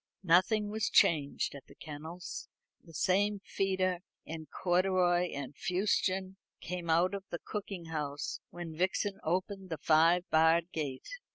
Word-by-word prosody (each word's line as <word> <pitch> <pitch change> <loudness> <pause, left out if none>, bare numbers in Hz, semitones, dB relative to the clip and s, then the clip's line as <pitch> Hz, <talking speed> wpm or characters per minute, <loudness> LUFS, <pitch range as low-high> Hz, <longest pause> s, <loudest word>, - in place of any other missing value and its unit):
Nothing 205 +4 +3
was 220 0 0
changed 145 -4 +3
at 140 - -11
the - - -16
kennels. 160 +3 -7 0.3
The 165 - -15
same 200 +6 +2
feeder 190 -2 0 0.3
in 160 -1 -7
corduroy 180 +1 +2
and 140 0 -6
fustian 190 +1 0 0.2
came 175 -1 -5
out 170 +4 +3
of 200 -1 -4
the 170 - -3
cooking 195 -2 -6
house 150 -3 -3
when 175 -2 -7
Vixen 190 +3 0
opened 185 +3 -2
the 160 - -3
five 165 +4 +4
barred 165 +2 +4
gate. 140 -5 -4
175 Hz, 140 wpm, -32 LUFS, 160-190 Hz, 0.3 s, five